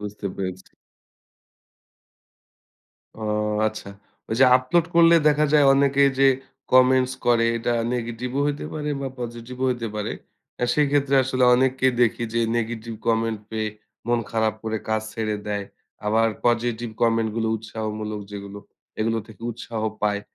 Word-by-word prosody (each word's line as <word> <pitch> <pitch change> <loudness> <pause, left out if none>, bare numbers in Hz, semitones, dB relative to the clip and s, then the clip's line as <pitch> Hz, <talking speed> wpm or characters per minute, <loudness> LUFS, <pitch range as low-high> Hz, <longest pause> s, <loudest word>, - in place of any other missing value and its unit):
বুঝতে 105 0 -6
পেরেছি। 95 -1 -5 2.4
ও 110 - -7 0.4
আচ্ছা। 110 -2 -5 0.4
ওইযে 115 +4 +4
আপলোড 155 +7 +1
করলে 170 0 +7
দেখা 150 0 +3
যায়, 150 -2 +6
অনেকে 140 0 +3 0.2
যে 135 - +6 0.5
কমেন্টস 130 0 +5
করে 120 -1 +4
এটা 115 +1 -1 0.2
নেগেটিভও 120 +2 -3
হইতে 145 0 -2
পারে 150 -1 -3
বা 135 - -2
পজিটিভও 120 +2 -5
হইতে 120 -2 -3
পারে। 105 - -3 0.5
অ্যা 125 - 0
সেক্ষেত্রে 140 -1 +2
আসলে 130 -1 +1
অনেককে 130 +1 +2 0.2
দেখি 120 0 +1
যে 115 - +2 0.2
নেগেটিভ 115 0 -3
কমেন্ট 115 -1 +1
পেয়ে 110 -1 -2 0.4
মন 120 0 +2
খারাপ 110 -1 +1
করে 110 0 -2
কাজ 110 0 0
ছেড়ে 110 -1 -2
দেয়। 105 -1 -2 0.4
আবার 110 +2 +3 0.2
পজিটিভ 120 0 0
কমেন্ট 115 -1 +2
গুলো 115 -1 0
উৎসাহমূলক 110 -1 -5
যেগুলো, 100 0 -7 0.4
এগুলো 115 +1 +1
থেকে 110 0 -15
উৎসাহ 115 -1 -6 0.2
পায়। 105 -1 +1
115 Hz, 135 wpm, -23 LUFS, 110-130 Hz, 2.4 s, করলে